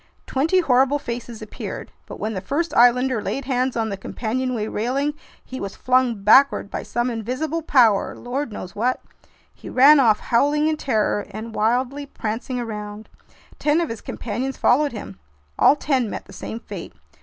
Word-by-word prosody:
Twenty 325 +8 +2
horrible 270 -1 +3
faces 235 -4 -6
appeared. 215 - -7 0.2
But - - -9
when 220 +1 -2
the 190 - -4
first 300 - -2
islander 245 0 +4
laid 275 +4 -3
hands 255 -1 0
on 225 -1 0
the 200 - -4
companionway 240 +3 -3
railing, 265 +8 -1 0.3
he 260 - -7
was 200 -1 -5
flung 250 -5 +1
backward 240 0 +5
by - - -3
some 240 +1 -2
invisible 255 +9 -3
power, 240 -10 +3
lord 260 +1 -4
knows 185 -3 -8
what! 245 +4 0 0.5
He - - -11
ran 285 +3 +7
off, 225 -5 +4
howling 290 +5 +2
in 315 -1 0
terror 215 -6 0
and 220 +1 -7
wildly 250 +6 0
prancing 245 +1 -4
around. 210 -2 -6 0.5
Ten 295 +2 +2
of 335 - -1
his 230 - -6
companions 250 +4 -4
followed 285 +4 +3
him. 200 - -8 0.4
All - - +6
ten 265 -6 0
met - - -6
the - - -14
same 225 - -6
fate. - - -8
250 Hz, 165 wpm, -22 LUFS, 220-275 Hz, 0.5 s, ran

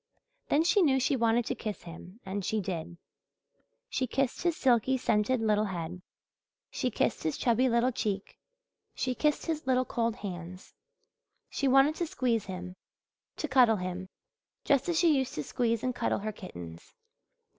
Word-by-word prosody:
Then 300 +3 +4
she 360 +4 +4
knew 270 -6 +4
she 265 - +2
wanted 230 -1 +2
to - - -1
kiss 215 -2 -5
him 180 +5 -11
and 195 +1 -3
she 215 +4 0
did. 175 -3 -4 0.9
She 260 - -1
kissed 270 +1 -1
his 345 -2 +1
silky, 260 0 +3
scented 235 +1 +1
little 215 -1 +2
head, 180 -2 -5 0.7
she 255 - -1
kissed - - 0
his 155 - -1
chubby 250 +2 +2
little 235 +2 +2
cheek, 205 -4 -3 0.6
she 255 - -1
kissed 300 +3 0
his 315 -4 -3
little 255 0 +3
cold 230 -2 -1
hands. 180 -2 -8 0.8
She 275 - 0
wanted 270 +3 +5
to 345 - -1
squeeze 240 -7 0
him 185 -1 -7 0.6
to 310 - -2
cuddle 255 -5 +5
him, 185 0 -5 0.6
just 280 +4 +2
as 340 - +1
she 330 -3 +5
used 265 -2 -1
to 150 - -2
squeeze 230 - -1
and 255 -1 0
cuddle - - 0
her 215 +1 -3
kittens. 85 - -10
230 Hz, 165 wpm, -30 LUFS, 190-265 Hz, 0.9 s, wanted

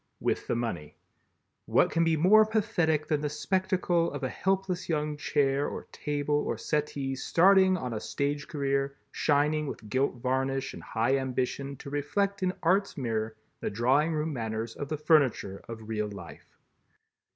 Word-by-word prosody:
with - - -1
the - - 0
money. 115 -11 -4 0.7
What - - +3
can 165 +1 +2
be 165 -1 +2
more 200 +7 +7
pathetic 175 -8 +1
than 150 -2 0
the 150 - -1
spectacle 180 +1 0
of 145 -1 -5
a 130 - 0
helpless 190 0 -1
young 150 -2 0
chair 140 -1 +1
or - - -5
table 145 0 -2
or - - -2
settee 145 -3 -2
starting 185 +6 +4
on 125 -7 -4
a 110 - -2
stage 140 +4 -2
career 140 -1 -1
shining 150 +1 +1
with 110 -5 -7
gilt 130 +1 +1
varnish 130 +2 -1
and - - -9
high 120 +4 +1
ambition 130 +1 -2
to 140 - -9
reflect 195 +8 -1
in 185 -1 +2
art's 190 +3 +2
mirror 110 -4 -2 0.2
the - - -2
drawing 130 +9 +2
room 155 0 -1
manners 115 -2 -3
of 145 - -5
the 155 - -2
furniture 140 - +2
of 110 -2 -8
real 105 -1 -2
life. 85 -8 -10
145 Hz, 165 wpm, -29 LUFS, 130-165 Hz, 0.7 s, more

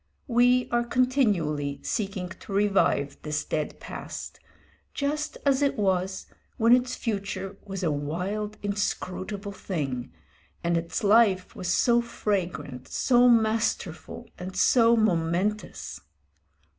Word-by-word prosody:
We 245 0 +4
are 240 0 +2
continually 205 - +1
seeking 195 -4 -2
to 185 - -11
revive 195 -8 +2
this 150 0 -2
dead 155 -1 -3
past, - - -7 0.6
just 300 +2 -2
as 275 -1 +3
it 280 -1 +1
was, 190 -2 0 0.3
when 230 +2 +6
its 250 0 -1
future 195 -3 -4
was 195 -2 -5
a 165 - +2
wild, 180 +9 -3
inscrutable 200 0 -3
thing, 140 -11 -4 0.5
and 170 0 +1
its 170 +4 -2
life 205 -3 +4
was 180 - -5
so 240 +3 +4
fragrant, 195 - -3
so 245 -1 +4
masterful, 220 -6 0
and 185 +1 -6
so 235 +3 +5
momentous. 190 +1 0
200 Hz, 115 wpm, -27 LUFS, 180-235 Hz, 0.6 s, when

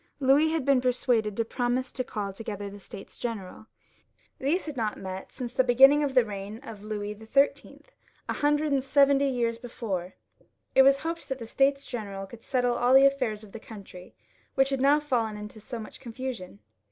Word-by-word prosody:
Louis 280 +3 +4
had 315 -4 -1
been 275 -2 +4
persuaded 240 -4 +1
to 230 - +1
promise 245 +2 -1
to 255 - -2
call 205 -5 -4
together 205 -1 -6
the 205 - -10
States 195 0 -11
General. 220 -2 -6 0.7
These 305 +8 0
had 305 -3 -6
not 220 -4 -2
met 190 0 -7
since 245 -2 -6
the 260 - +3
beginning 270 +4 +6
of 275 -2 -2
the 250 -3 +6
reign 205 0 -6
of 225 -6 -9
Louis 210 -1 -4
XIII., 220 +7 0 0.5
a - - -1
hundred 295 +1 +1
and 275 -2 +2
seventy 280 0 +4
five 260 - -2
years 230 -1 0
be 245 - -8
fore. 190 -7 -4 0.6
It 265 - +7
was 275 +1 +6
hoped 330 -1 -4
that 265 - -2
the 235 - -7
States 275 +4 +1
General 200 -5 -5
would 235 - -11
settle 245 -1 +1
all 245 +2 +4
tJie 275 +1 +7
alfairs 220 -6 -2
of 210 - -13
the 225 - -8
country, 195 -5 -12 0.4
which 270 0 +3
had 270 -2 -1
now 285 +2 +5
fallen 235 -7 -1
into 210 +1 -9
so 225 +3 -7
much 215 -1 -9
confusion. 235 - -7
245 Hz, 200 wpm, -27 LUFS, 210-270 Hz, 0.7 s, It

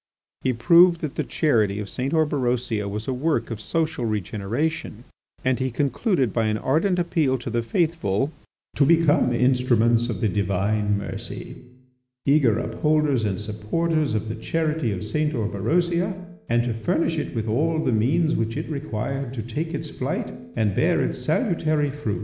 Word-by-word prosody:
He 130 - +1
proved 170 +7 +5
that 150 -4 -3
the - - -1
charity 110 -10 +1
of 105 - -4
St. 130 +6 -3
Orberosia 125 -9 0
was 105 +2 -5
a 130 - 0
work 130 -3 -1
of 110 -1 -5
social 160 -1 -1
regeneration, 110 - -2 0.4
and 130 -1 +2
he 130 0 0
concluded 140 - 0
by 115 -2 +1
an 110 0 0
ardent 165 - +1
appeal 160 -6 +1
to 120 -1 -6
the 120 0 0
faithful 145 - 0 0.5
"to - - +5
become 160 -4 +4
instruments 120 -2 +3
of 105 -6 -3
the 110 - +1
Divine 100 +1 0
mercy, 100 - -6 0.7
eager 140 -7 +4
upholders 150 0 +1
and 100 -3 -1
supporters 110 +7 -1
of 110 +1 -2
the 110 - -3
charity 155 +2 -1
of 100 +1 -4
St. 150 +8 0
Orberosia, 170 - 0 0.3
and 120 0 +3
to 120 -1 -1
furnish 165 +7 0
it - - -5
with 115 -1 -2
all 155 +9 +1
the - - +1
means 150 +9 +2
which 115 0 -1
it - - -4
required 135 -2 -3
to 115 - -4
take 150 +9 -4
its 155 0 -5
flight - - -3 0.2
and 105 -3 +1
bear - - +2
its - - -2
salutary 155 -4 +1
fruits." 135 -8 -3
125 Hz, 165 wpm, -24 LUFS, 110-155 Hz, 0.7 s, proved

